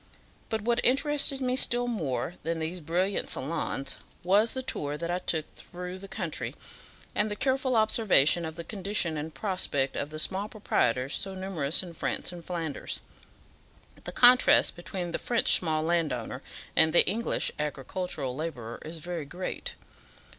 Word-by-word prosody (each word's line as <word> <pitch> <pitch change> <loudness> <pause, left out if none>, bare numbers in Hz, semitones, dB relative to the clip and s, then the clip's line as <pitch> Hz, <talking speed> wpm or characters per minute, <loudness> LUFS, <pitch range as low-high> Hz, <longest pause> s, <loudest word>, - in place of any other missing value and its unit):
But 220 -2 -2
what 235 +1 +2
interested 280 +1 +4
me 255 0 +1
still 245 -1 +4
more 170 - -2
than 165 +2 -2
these 165 +3 -3
brilliant 180 +5 0
salons, 135 -1 -2 0.3
was 205 +7 +3
the 260 - -2
tour 145 - -2
that 170 +2 -3
I 180 - 0
took 160 -3 -1
through 180 +1 -8
the 195 - -9
country, - - -4 0.6
and 210 +1 +1
the 210 - -2
careful 260 +1 +1
observation 215 - +4
of 160 -1 -5
the 170 - -6
condition 195 -4 0
and 155 +1 -4
prospect 155 -9 0
of 145 - -2
the 155 - -7
small 195 +6 0
proprietors 130 - 0
so 195 -1 -2
numerous 185 -5 0
in 175 -2 -9
France 165 - -2
and 175 -1 -9
Flanders. 165 -5 -3 1.0
The - - -5
contrast 250 +1 +6
between 175 0 -5
the - - -2
French 240 -1 +2
small 155 -3 0
landowner 150 -7 -1 0.3
and 160 0 +4
the - - +6
English 225 +5 0
agricultural 150 -1 -3
labourer 130 -7 -5
is 160 +2 -6
very 170 -1 -5
great. 180 +6 -5
175 Hz, 155 wpm, -29 LUFS, 155-210 Hz, 1.0 s, contrast